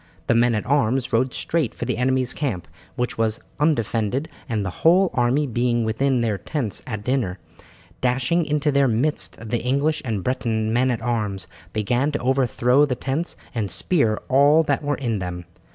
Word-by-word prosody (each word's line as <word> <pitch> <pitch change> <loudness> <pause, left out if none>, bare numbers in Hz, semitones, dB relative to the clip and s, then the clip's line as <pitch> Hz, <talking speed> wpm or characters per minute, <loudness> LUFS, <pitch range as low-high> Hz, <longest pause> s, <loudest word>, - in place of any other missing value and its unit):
The - - +2
men 120 0 +3
at 105 - -2
arms 130 -2 +1
rode 125 +3 +2
straight 155 -6 -1
for - - -4
the - - -1
enemy's 130 -1 +1
camp, 125 - -3 0.3
which 125 -2 -2
was 110 -1 0 0.2
undefended, 130 -1 0 0.2
the 105 -4 -1
whole 180 +3 +5
army 125 +4 +2
being 120 -2 0
within 125 +3 +1
their 110 -4 0
tents 130 -10 -3
at 105 -4 -4
dinner. 120 -8 -1 0.6
Dashing 130 +7 +1
into 150 0 +1
their 140 -1 +3
midst 120 -1 -1
the 120 - 0
English 140 +6 0
and 110 -6 -2
Breton 115 -4 -1
men 130 +2 +2
at 115 -3 -2
arms 105 -6 -2 0.3
began 120 +8 0
to 145 - -1
overthrow 130 +1 +2
the 140 -4 +1
tents 140 +7 -3 0.2
and 110 -5 -2
spear 115 - +1
all 145 +4 +5
that 140 -3 0
were 145 0 0
in 115 -6 -2
them. 90 -1 -5
125 Hz, 170 wpm, -23 LUFS, 110-140 Hz, 0.6 s, whole